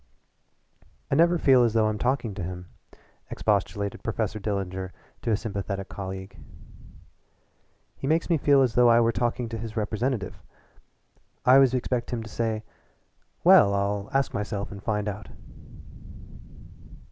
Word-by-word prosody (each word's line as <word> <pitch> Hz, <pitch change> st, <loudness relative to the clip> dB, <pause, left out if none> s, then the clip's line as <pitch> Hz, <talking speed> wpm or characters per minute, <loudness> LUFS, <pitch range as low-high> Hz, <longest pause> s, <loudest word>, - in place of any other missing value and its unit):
"I -, -, +2 dB
never 170 Hz, +3 st, +4 dB
feel 130 Hz, -5 st, +5 dB
as 115 Hz, -2 st, +1 dB
though 110 Hz, -1 st, +3 dB
I'm 110 Hz, -1 st, -1 dB
talking 125 Hz, -3 st, 0 dB
to 95 Hz, -, -6 dB
him," 90 Hz, +1 st, -6 dB, 0.6 s
expostulated 100 Hz, -1 st, -1 dB
Professor 110 Hz, -1 st, -2 dB
Dillinger 95 Hz, -3 st, -3 dB, 0.3 s
to -, -, -3 dB
a 110 Hz, -, +3 dB
sympathetic 100 Hz, -3 st, -4 dB
colleague. 95 Hz, 0 st, -7 dB, 1.6 s
"He 135 Hz, -, -5 dB
makes 160 Hz, +3 st, +1 dB
me 165 Hz, -3 st, +2 dB
feel 140 Hz, -1 st, +4 dB
as 125 Hz, -3 st, 0 dB
though 120 Hz, -1 st, +5 dB
I 115 Hz, 0 st, +6 dB
were 115 Hz, 0 st, +3 dB
talking 120 Hz, +1 st, -1 dB
to 115 Hz, -1 st, -5 dB
his 115 Hz, 0 st, -7 dB
representative. 110 Hz, 0 st, -2 dB, 1.0 s
I 125 Hz, -, +6 dB
always 135 Hz, -1 st, +6 dB
expect 125 Hz, -1 st, -2 dB
him 120 Hz, -2 st, -3 dB
to 110 Hz, -, -10 dB
say: 110 Hz, -2 st, -2 dB, 0.8 s
'Well, 100 Hz, 0 st, +7 dB
I'll 100 Hz, +1 st, -1 dB
ask 135 Hz, 0 st, 0 dB
myself 100 Hz, -1 st, -3 dB
and 100 Hz, -1 st, -8 dB
find 105 Hz, 0 st, -2 dB
out.'" 105 Hz, -1 st, -5 dB
110 Hz, 145 wpm, -26 LUFS, 100-125 Hz, 1.6 s, Well